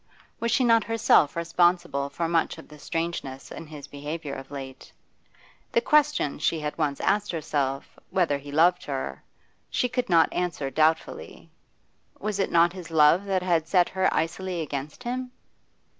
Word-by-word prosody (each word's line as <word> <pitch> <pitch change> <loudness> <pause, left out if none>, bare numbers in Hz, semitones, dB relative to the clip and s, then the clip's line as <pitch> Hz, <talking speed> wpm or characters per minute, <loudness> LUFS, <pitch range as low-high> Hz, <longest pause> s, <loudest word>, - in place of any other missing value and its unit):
Was 235 - -1
she 260 - +3
not 230 -2 +4
herself 225 -10 +3
responsible 170 -4 +1
for 170 +3 -2
much 165 -1 0
of - - -12
the 150 -1 -14
strangeness 165 -5 -4
in 165 - -8
his 150 -2 -9
behaviour 145 +1 -6
of 135 0 -8
late? 135 -2 -9 0.8
The - - +5
question 300 - +2
she 160 +1 +1
had 150 -1 -4
once 145 -3 -1
asked 205 +1 +1
herself, 145 -4 -3
whether 165 -7 +1
he 145 +1 -10
loved 175 +4 +3
her, 135 -2 -4 0.5
she 250 - +1
could 250 -2 -2
not 165 -2 +4
answer 160 -6 -2
doubtfully; 160 +2 -1 0.7
was 210 -1 -3
it 195 - 0
not 170 +1 +4
his 180 -3 -9
love 160 +4 +5
that 190 -2 0
had 170 -3 +1
set 180 0 +3
her 190 0 +1
icily 175 +2 -2
against 150 - -5
him? 250 +1 -4
165 Hz, 160 wpm, -26 LUFS, 145-190 Hz, 0.8 s, The